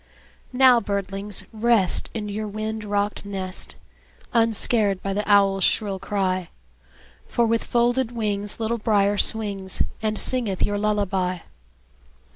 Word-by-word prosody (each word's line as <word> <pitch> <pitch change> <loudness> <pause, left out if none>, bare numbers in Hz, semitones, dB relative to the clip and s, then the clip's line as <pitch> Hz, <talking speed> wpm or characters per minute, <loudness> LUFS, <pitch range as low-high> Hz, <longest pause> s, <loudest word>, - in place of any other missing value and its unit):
Now, 255 -1 +6
birdlings, 200 -1 -2
rest, 220 -4 +2
In 210 -2 -3
your 210 +1 -4
wind 215 +1 -4
rocked 205 0 -1
nest, 190 -2 -5 0.6
Unscared 225 -3 +2
by 195 - -2
the 205 +2 -1
owl's 195 -1 +4
shrill 200 -3 +1
cry; 185 -3 -1 0.8
For 235 - +1
with 230 0 +1
folded 240 +1 +1
wings 210 -3 -2
Little 230 +1 -1
Brier 205 -2 +2
swings, 200 -4 +1 0.2
And 215 -1 -1
singeth 230 -7 0
your 205 0 -2
lullaby. 195 -4 0
205 Hz, 120 wpm, -23 LUFS, 195-225 Hz, 0.8 s, Now